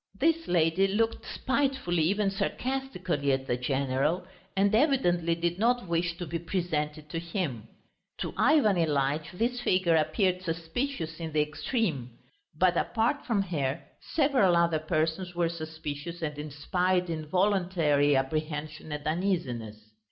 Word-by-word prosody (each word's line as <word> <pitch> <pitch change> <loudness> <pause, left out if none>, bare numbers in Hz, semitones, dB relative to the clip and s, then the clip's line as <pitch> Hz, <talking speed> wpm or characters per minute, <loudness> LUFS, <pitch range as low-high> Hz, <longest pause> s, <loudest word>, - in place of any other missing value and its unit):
This 330 +3 +2
lady 170 +2 +3
looked 225 +3 0
spitefully, 265 - 0
even 195 +5 +2
sarcastically, 190 - -1
at 135 0 -1
the 120 - 0
general, 135 +7 0 0.3
and 200 +2 +3
evidently 180 - +3
did 170 +2 -1
not 240 -1 +2
wish 170 0 0
to 175 - -4
be 170 +1 -3
presented 155 -4 -2
to 165 - -2
him. 165 - -3 0.5
To - - -3
Ivan 270 - +4
Ilyitch 150 -1 +1
this 240 +6 -1
figure 185 -6 +3
appeared 180 +4 +1
suspicious 165 - -3
in 160 -2 -5
the 155 - +3
extreme. 150 - -2 0.4
But 180 -2 +3
apart 235 +7 0
from 215 -6 +2
her, 150 -5 -2 0.3
several 265 - +4
other 170 -2 +3
persons 160 +3 -1
were 170 -1 +1
suspicious 160 0 -6
and 150 -1 -2
inspired 180 +5 0
involuntary 165 -3 +2
apprehension 155 +3 -2
and 150 0 -5
uneasiness. 125 - -2
170 Hz, 130 wpm, -29 LUFS, 150-195 Hz, 0.5 s, Ivan